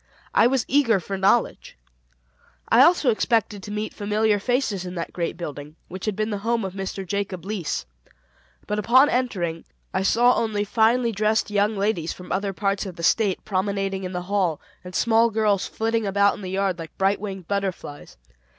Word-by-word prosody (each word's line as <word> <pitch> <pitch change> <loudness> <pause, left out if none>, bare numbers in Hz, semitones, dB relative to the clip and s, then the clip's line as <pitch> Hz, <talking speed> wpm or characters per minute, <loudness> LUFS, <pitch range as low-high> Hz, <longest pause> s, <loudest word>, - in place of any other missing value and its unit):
I 230 - +5
was 260 -2 0
eager 250 -7 +3
for 195 +2 -5
knowledge. 195 - +1 0.9
I 230 - +6
also 305 -4 +5
expected 215 -2 0
to 200 - -9
meet 210 +1 -4
familiar 210 0 +1
faces 235 -4 -1
in 180 0 -7
that 170 - -5
great 170 -2 -3
building, 150 -3 -7
which 185 +1 -7
had 215 -2 -1
been 215 +1 -2
the 205 - -2
home 230 0 -1
of 190 - -5
Mr. 195 0 -5
Jacob 195 -2 -3
Leese. 195 - -3 0.8
But 210 0 -2
upon 255 +7 +5
entering 180 -10 -1 0.3
I 190 - 0
saw 240 +5 +4
only 215 -2 0
finely 230 +3 +2
dressed 215 +1 0
young 205 +1 +1
ladies 195 -5 -1
from 180 - -11
other 200 +1 -1
parts 195 +1 -1
of 185 - -8
the 170 - -8
State 200 +1 +1
promenading 195 -1 -1
in 185 - -4
the 180 -1 -4
halls, 185 -4 0 0.3
and 180 0 -9
small 230 0 +3
girls 210 -3 +1
flitting 225 -1 -1
about 200 +1 +3
in - - -9
the 185 - -6
yard 190 -2 -1
like 165 -1 -9
bright 195 +1 +1
winged 190 -4 -6
butterflies. 190 - -4
200 Hz, 185 wpm, -23 LUFS, 185-220 Hz, 0.9 s, I